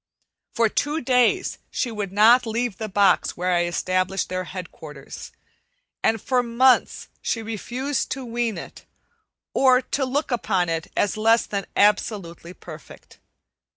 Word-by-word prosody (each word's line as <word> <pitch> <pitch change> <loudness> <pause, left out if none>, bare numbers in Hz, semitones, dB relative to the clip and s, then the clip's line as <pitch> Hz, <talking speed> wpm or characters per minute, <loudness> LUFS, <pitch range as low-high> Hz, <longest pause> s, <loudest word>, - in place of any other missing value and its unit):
For 230 -1 +2
two 295 +8 -1
days 255 +9 +2
she 245 - -2
would 205 -3 -4
not 225 +5 +5
leave 230 -2 -2
the 220 -1 -4
box 195 -1 +2
where 180 +1 0
I 175 0 +2
established 185 +2 -1
their 185 0 -3
headquarters, 160 -6 -9 0.7
and 225 0 +1
for 250 +4 +1
months 245 +2 +2
she 225 - -2
refused 245 +6 -3
to 265 -1 -7
wean 235 -2 -2
it, - - -10 0.7
or 255 -2 +5
to 270 +2 -3
look 270 +3 -2
upon 190 -7 0
it 165 -1 -2
as 205 +1 +1
less 225 +2 +3
than 200 -1 -4
absolutely 200 -5 0
perfect. - - -13
220 Hz, 140 wpm, -23 LUFS, 185-245 Hz, 0.7 s, not